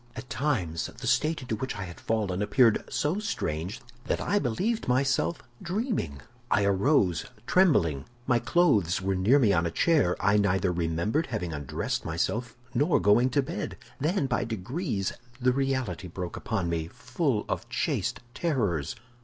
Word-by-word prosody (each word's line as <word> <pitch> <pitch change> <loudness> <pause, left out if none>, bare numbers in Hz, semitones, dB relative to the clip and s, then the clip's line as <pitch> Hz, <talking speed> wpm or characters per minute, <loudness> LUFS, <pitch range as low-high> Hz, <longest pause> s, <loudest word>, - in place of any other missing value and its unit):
"At 125 - -8
times 95 - -1
the - - -7
state 140 +4 +1
into 120 -3 -2
which 130 +1 -4
I 105 - -3
had 85 -2 -9
fallen 105 -4 -1
appeared 110 +2 +4
so 155 +7 0
strange 95 - -3 0.3
that - - 0
I 205 - +1
believed 195 - -1
myself 135 +4 +1 0.2
dreaming. 185 - -2 0.3
I 100 - +3
arose 100 - +2 0.2
trembling. 105 - +3 0.2
My 120 -2 +3
clothes 110 - +3
were 95 0 0
near 95 +9 +4
me 110 -8 +4
on 85 -1 +2
a - - -1
chair; 140 - +3
I 100 +2 +3
neither 95 -2 +2
remembered 85 - 0
having 90 -8 -3
undressed 70 -3 -3
myself 115 +9 -2 0.2
nor 150 +4 +3
going 105 +7 +4
to 140 +2 +2
bed. - - -5 0.2
Then 155 +2 +1
by 125 -2 0
degrees 110 - -2 0.3
the 125 0 +3
reality 130 -9 -1
broke 90 0 -5
upon 100 -6 -2
me, 80 -1 -1
full 130 - -1
of - - -3
chaste - - -1
terrors. 105 - -1
115 Hz, 155 wpm, -28 LUFS, 90-140 Hz, 0.3 s, appeared